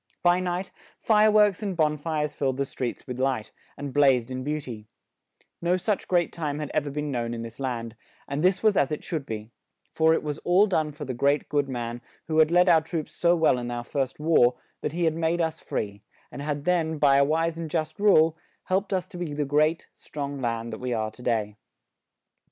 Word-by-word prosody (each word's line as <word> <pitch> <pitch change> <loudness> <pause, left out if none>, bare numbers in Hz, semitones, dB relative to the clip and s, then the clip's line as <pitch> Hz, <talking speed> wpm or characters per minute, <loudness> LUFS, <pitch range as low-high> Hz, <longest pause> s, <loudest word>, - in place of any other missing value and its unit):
By 175 0 +4
night, 180 +1 -3 0.3
fire 215 -1 +4
works 210 -2 +4
and 195 -4 -3
bon 155 -2 +2
fires 150 -1 -2
filled 135 -2 -1
the 140 - 0
streets 125 -2 -5
with 125 -1 -6
light, 130 -5 -1 0.3
and 140 -2 -6
blazed 130 -4 +3
in 130 0 -4
beau 150 +2 -1
ty; 115 -7 -9 0.7
no 175 +2 +2
such 200 +2 -1
great 175 -2 +1
time 150 -3 -3
had 150 -1 -4
ever 145 - 0
been 150 +1 -3
known 120 -2 -2
in 115 - -5
this 115 +2 -9
land; 120 -4 -3 0.3
and 140 +3 -2
this 185 +2 +2
was 215 -2 +4
as 140 -3 +2
it 150 - -3
should 155 -5 -4
be; 110 0 -6 0.4
for 160 0 +4
it - - -2
was 150 -1 -4
all 180 +4 +4
done 160 -7 0
for 150 0 -8
the 130 - -3
great, 140 +4 +1
good 145 -2 0
man, 120 -1 -4 0.3
who 160 -1 +1
had 155 -1 +6
led 175 +1 +4
our 160 - +6
troops 160 -1 -4
so 175 0 +3
well 160 -6 +3
in 120 0 -4
our 120 0 -4
first 135 +2 -3
war, 150 -6 +4 0.3
that - - -2
he 175 +1 -1
had 160 -2 +3
made 165 +1 0
us 160 -1 -1
free; 100 -1 -4 0.3
and 140 - -7
had 145 0 -3
then, 165 -3 +1
by 140 -2 +5
a 140 - +6
wise 165 +3 0
and 165 -1 -4
just 155 +1 -2
rule, 165 -6 +5 0.3
helped 195 +2 -1
us 185 -2 -1
to - - -10
be 165 -4 -3
the 145 0 -1
great, 155 +3 +1
strong 140 -1 -6
land 115 -1 -2
that - - -6
we 125 -1 -2
are 110 -1 -1
to 115 - -14
day. 110 -4 -1
150 Hz, 225 wpm, -26 LUFS, 130-165 Hz, 0.7 s, had